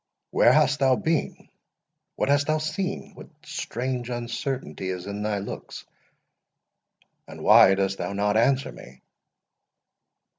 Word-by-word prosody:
"Where - - +5
hast 145 - +3
thou 135 -2 +4
been?—what 160 +3 -5
hast 145 +1 +2
thou 155 0 +2
seen?—what 190 +5 -5 0.2
strange 125 -6 -4
uncertainty 120 -3 -4
is 90 -1 -5
in 100 +1 -5
thy 105 -1 -1
looks?—and 100 0 -13
why 95 - +7
dost 95 0 -1
thou - - -3
not 105 +1 0
answer 130 +4 +2
me?" 65 +1 -14
125 Hz, 110 wpm, -25 LUFS, 100-145 Hz, 0.2 s, why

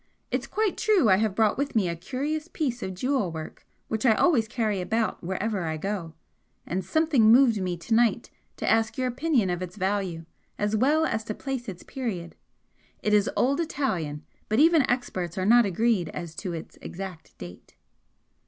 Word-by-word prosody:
It's - - -1
quite 430 -3 -1
true 410 - +3
I 190 - +6
have 215 -2 0
brought 220 +2 +2
with 280 -2 -2
me 205 -5 +3
a 170 - -2
curious 285 - -3
piece 260 -8 -2
of 190 -3 -4
jewel 250 -3 0
work 160 -1 -8 0.2
which 220 -1 -2
I 230 -4 +5
always 250 -9 +3
carry 215 -4 -1
about 220 +5 -1
wherever 190 +2 -2
I 160 -1 -2
go 175 -2 -4 0.5
and 185 +2 -2
something 275 - +3
moved 235 -4 +5
me 180 -1 -2
to 170 +7 -3
night 235 0 +2 0.3
to - - -4
ask 225 +3 +2
your 260 - 0
opinion 250 - +1
of 175 0 -3
its 180 +1 -6
value, 190 -4 -2 0.3
as 210 +1 0
well 295 +8 +3
as 220 -7 -1
to 215 - -4
place 265 -4 -4
its 180 -2 -9
period. 205 -11 -5 0.7
It 210 - +1
is 205 -1 +4
old 275 +4 +2
Italian; 185 - -2 0.2
but 215 - +1
even 315 -2 +5
experts 185 -9 -2
are 185 - 0
not 235 +1 +6
agreed 195 -3 +1
as 170 -2 -6
to 185 - -4
its 165 -2 -8
exact 185 -3 -8
date." 90 0 -11
215 Hz, 185 wpm, -26 LUFS, 185-255 Hz, 0.7 s, I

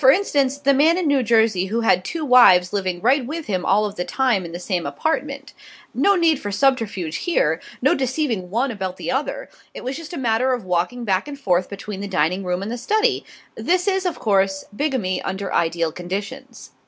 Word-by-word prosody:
For 265 - +6
instance, 280 -5 +2
the 280 -1 +2
man 315 +5 +4
in 365 - -1
New 285 -3 +3
Jersey 220 -5 +2
who 230 +4 -1
had 185 -5 +3
two 320 - -4
wives 195 -9 +6
living 185 -3 -2
right 260 +4 +3
with 310 +5 -5
him 185 -4 -2
all 205 +3 +2
of 205 0 -6
the 180 - -1
time 240 -5 0
in 170 - -8
the 170 - -5
same 180 -3 -2
apartment. 280 - -3 0.4
No 400 0 +3
need 330 -5 +3
for 205 - -5
subterfuge 205 - 0
here, 160 - 0 0.2
no 280 - +4
deceiving 260 - -2
one 240 +7 0
about 190 -4 -5
the - - -4
other. 295 - -2 0.3
It - - -8
was 260 +2 -4
just 330 -2 -9
a 345 - -5
matter 250 0 +1
of 245 -6 -4
walking 185 +7 -1
back 190 +4 0
and 285 -1 -8
forth 180 -8 +1
between 200 0 -7
the 200 - -4
dining 185 0 0
room 180 +1 -2
and 210 - -5
the 240 - -4
study. 435 - +1 0.3
This 360 +2 0
is, 385 -1 +1
of 350 - -3
course, 195 -2 +1
bigamy 240 -10 -1
under 190 +1 -4
ideal 165 -1 0
conditions. 200 - -7
230 Hz, 210 wpm, -21 LUFS, 185-275 Hz, 0.4 s, For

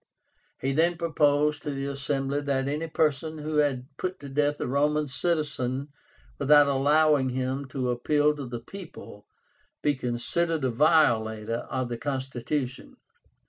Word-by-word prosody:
He 135 - -1
then 170 +4 +2
proposed 150 -2 +2
to - - -5
the 135 -1 -3
Assembly 140 0 -2
that 135 -2 -1
any 150 +3 -2
person 155 0 0
who 155 0 -3
had 140 -4 +1
put 185 0 -3
to 140 - -8
death 145 +1 0
a - - -2
Roman 150 +3 +1
citizen 140 -3 -1 0.5
without 145 0 +6
allowing 145 0 +3
him 130 +2 -2
to 130 -1 -2
appeal 150 +5 +2
to 140 -3 -5
the 120 -1 -5
people 170 - -11 0.6
be 150 - +3
considered 140 +6 -1
a 130 - +1
violator 115 -6 +2
of 130 -1 -2
the 120 -1 -5
constitution. 130 -1 -3
140 Hz, 140 wpm, -27 LUFS, 130-150 Hz, 0.6 s, without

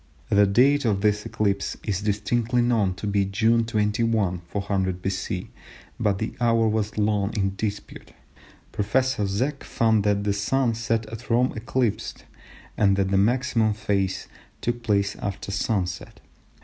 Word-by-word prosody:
The 100 0 +5
date 135 +8 +4
of 105 -5 +1
this 105 0 +1
eclipse 100 -2 -1
is 100 -2 -2
distinctly 115 +4 0
known 110 -6 +1
to 90 - -7
be 100 -1 +1
June 110 +4 +2
21, 105 -3 0
400 95 -2 -1
B.C., 95 0 -3 0.5
but 105 -4 +1
the 110 - -3
hour 115 -1 +3
was 110 -1 -1
long 105 -1 +1
in 95 -1 0
dispute. 100 0 -5 0.6
Professor 110 +1 0
Zech 130 +9 -2
found 110 -2 +2
that 100 -1 +1
the 100 -1 +1
Sun 115 +5 +1
set 115 0 -1
at 115 +4 -9
Rome 125 +2 +2
eclipsed, 115 -1 -2 0.5
and 100 -2 +3
that 95 -1 0
the 100 - +3
maximum 115 0 +2
phase 100 -2 -1 0.3
took 120 0 -2
place 100 -4 +1
after 100 -1 -5
sun 100 -1 0
set. 90 -1 -8
105 Hz, 150 wpm, -24 LUFS, 100-115 Hz, 0.6 s, The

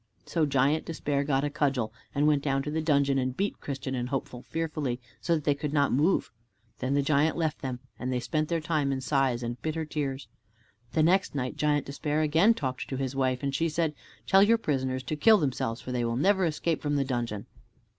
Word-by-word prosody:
So 160 -3 +1
Giant 140 +3 +2
Despair 145 -4 -1
got 140 -1 +1
a 145 - 0
cudgel, 135 -7 0 0.2
and 145 +1 +2
went 150 -2 +3
down 135 -1 0
to 150 - -4
the 160 +1 -1
dungeon 140 -3 +2
and 130 0 -2
beat 200 +1 -1
Christian 135 -1 -4
and 125 -1 -2
Hopeful 125 -2 -4
fearfully, 150 -6 -3 0.2
so 170 - +2
that 155 - -3
they 145 - +3
could 145 +1 -4
not 145 -2 +3
move. 155 +9 +2 0.5
Then 130 +2 0
the 140 - +2
giant 150 +3 +2
left 160 -2 -1
them, 125 -2 -4 0.2
and 130 +1 -2
they 125 - 0
spent 155 +5 -1
their 165 -1 0
time 155 -3 0
in 135 - -1
sighs 130 -3 +1
and 120 +1 -4
bitter 160 0 -2
tears. 140 -3 -3 0.7
The 155 - +3
next 185 0 +2
night 130 -2 -2
Giant 150 -2 +1
Despair 150 +2 -1
again 165 +9 +4
talked 130 - -3
to 130 - -3
his 135 0 -3
wife, 130 -1 0
and 140 -1 -1
she 165 +4 +1
said, 160 0 0 0.3
"Tell 195 - +5
your 225 +3 +5
prisoners 130 - -1
to 155 - -3
kill 215 +8 +6
themselves, 130 - -1
for 125 - -6
they 125 -1 0
will 115 0 -1
never 190 +5 +3
escape 165 0 -1
from 145 -1 0
the 140 -1 +1
dungeon." 120 -5 -3
140 Hz, 220 wpm, -28 LUFS, 130-155 Hz, 0.7 s, kill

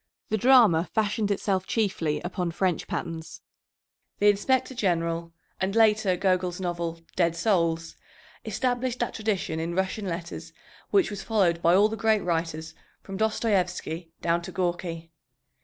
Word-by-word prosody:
The 215 - +1
drama 220 -8 +5
fashioned 215 -1 +1
itself 195 -2 0
chiefly 170 -9 0
upon 180 -1 -2
French 180 0 -1
patterns. 165 -1 -5 0.8
The 205 - +5
Inspector 260 +6 0
General 170 -6 -1 0.3
and 190 +2 -1
later 215 -4 +4
Gogol's 185 -1 0
novel, 170 -2 -3
Dead 170 -2 +2
Souls, 170 -4 0 0.5
established 245 +3 -1
that 240 - -2
tradition 200 -7 -2
in 170 +1 -3
Russian 190 +2 -1
letters 170 0 -6 0.4
which 385 - +3
was 200 -1 -5
followed 185 -7 +1
by 170 +1 +5
all 205 +3 +6
the 220 - -4
great 220 0 +2
writers 165 -2 -2 0.3
from 195 - -7
Dostoyevsky 185 -6 -1
down 170 0 +2
to 180 +2 -8
Gorky. 175 -2 -3
185 Hz, 140 wpm, -26 LUFS, 170-215 Hz, 0.8 s, all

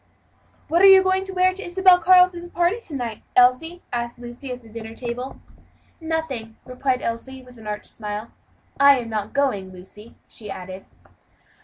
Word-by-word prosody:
"What 340 +2 +2
are 390 - +9
you 385 -1 +8
going 375 0 +1
to 385 - -6
wear 370 0 +2
to 390 +2 -8
Isabel 365 0 +4
Carleton's 360 -1 +4
party, 350 +6 0
to 300 - -7
night, 235 -5 -5
Elsie?" 255 +8 +3
asked 240 0 -3
Lucy, 245 +2 -9
at 250 -1 -7
the - - -16
dinner 225 0 -9
table. 245 +2 -6 0.6
"Nothing," 320 -9 -4
replied 255 0 -2
Elsie, 260 +3 -5
with 250 -2 -16
an 215 - -11
arch 210 0 -5
smile, 210 +1 -6 0.5
"I 280 -1 +7
am 235 -2 -5
not 215 -1 -3
going, 230 -10 0
Lucy," 190 +5 -13
she 210 -2 -10
added. 185 0 -8
255 Hz, 170 wpm, -22 LUFS, 225-345 Hz, 0.6 s, are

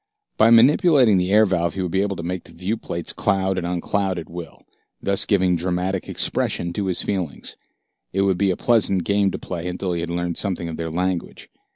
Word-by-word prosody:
By 110 - +5
manipulating 125 - +5
the 90 +1 -1
air 110 +1 +6
valve 85 -3 0
he 95 - -2
would 90 - -3
be 95 - +1
able 100 -1 -1
to 85 - -6
make 90 +1 -4
the - - -15
viewplates 90 -2 -4
cloud 95 -1 +1
and 85 - -3
uncloud 95 +2 -1
at 85 - -6
will, 85 -1 -9 0.4
thus 100 0 0
giving 95 -3 +3
dramatic 90 +2 -2
expression 85 0 -1
to 100 +1 -2
his 90 - +2
feelings. 90 -7 -3 0.6
It 95 +1 +1
would 95 -2 +1
be 100 - +2
a 90 - 0
pleasant 105 -6 +2
game 100 +2 +2
to - - -4
play 90 -1 -5
until 90 0 -3
he 85 - -2
had 85 - -4
learned 85 0 -2
something 90 -4 -2
of 80 - -5
their 80 -1 -3
language. 90 +1 -3
95 Hz, 210 wpm, -22 LUFS, 85-100 Hz, 0.6 s, air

